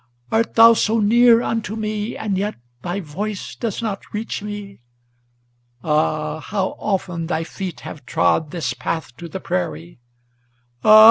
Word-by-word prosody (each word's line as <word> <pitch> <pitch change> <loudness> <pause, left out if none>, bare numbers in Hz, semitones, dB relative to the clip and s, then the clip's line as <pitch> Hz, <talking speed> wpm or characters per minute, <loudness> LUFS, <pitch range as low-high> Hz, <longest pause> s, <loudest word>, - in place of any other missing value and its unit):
Art 225 +1 +1
thou 230 0 +9
so 225 0 +2
near 235 +2 +6
unto 220 -2 -2
me, 215 0 -3
and 210 -3 -1
yet 205 +3 -1 0.3
thy 180 +7 -3
voice 195 +6 -5
does 230 -1 -3
not 205 -3 -4
reach 215 0 -3
me? 205 -1 -7 1.0
Ah! 155 0 0
how 190 +4 -1
often 180 -5 -2
thy 160 -1 -1
feet 185 +1 -6
have 145 -5 -9
trod 100 - +2
this 145 -7 -2
path 130 +1 -4
to 170 - -7
the 190 - -5
prairie! 85 - -3 0.8
Ah! 215 0 +9
195 Hz, 145 wpm, -21 LUFS, 160-215 Hz, 1.0 s, thou